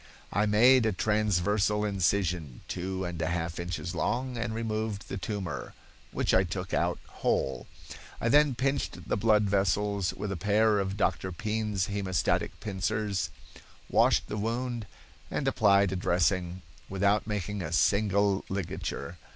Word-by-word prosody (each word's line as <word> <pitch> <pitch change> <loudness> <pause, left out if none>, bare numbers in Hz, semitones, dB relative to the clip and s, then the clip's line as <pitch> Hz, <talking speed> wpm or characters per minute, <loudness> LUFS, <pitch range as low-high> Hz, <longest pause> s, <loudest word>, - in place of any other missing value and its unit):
"I 105 +1 +2
made 120 +3 +5
a - - +2
transversal 105 +1 +1
incision 90 -7 0
two 95 +1 -3
and 85 -1 -4
a 80 - 0
half 85 -1 -2
inches 85 0 -4
long 125 +7 -1
and 120 -1 -2
removed 110 -2 -3
the - - -3
tumor, 100 -3 -4 0.4
which - - 0
I 95 - +5
took 95 +1 -5
out 85 0 +1 0.2
whole. 65 - 0 0.5
I - - -1
then 145 +1 +5
pinched 135 +3 -2
the - - +2
blood 105 +1 +3
vessels 100 -1 +1
with 105 0 -4
a - - -2
pair 105 +3 +3
of 95 0 -2
Dr. 95 -2 0
Pean's 105 0 -1
hemostatic 100 -3 -1
pincers, 100 -2 -1 0.6
washed - - +4
the 105 - -4
wound 115 +1 -2 0.4
and - - -2
applied 100 -2 +4
a - - -2
dressing, 90 0 0 0.3
without 100 +3 +1
making 105 -1 -3
a 85 - -4
single 100 +2 +2
ligature. 90 -3 -4
100 Hz, 145 wpm, -29 LUFS, 90-110 Hz, 0.6 s, made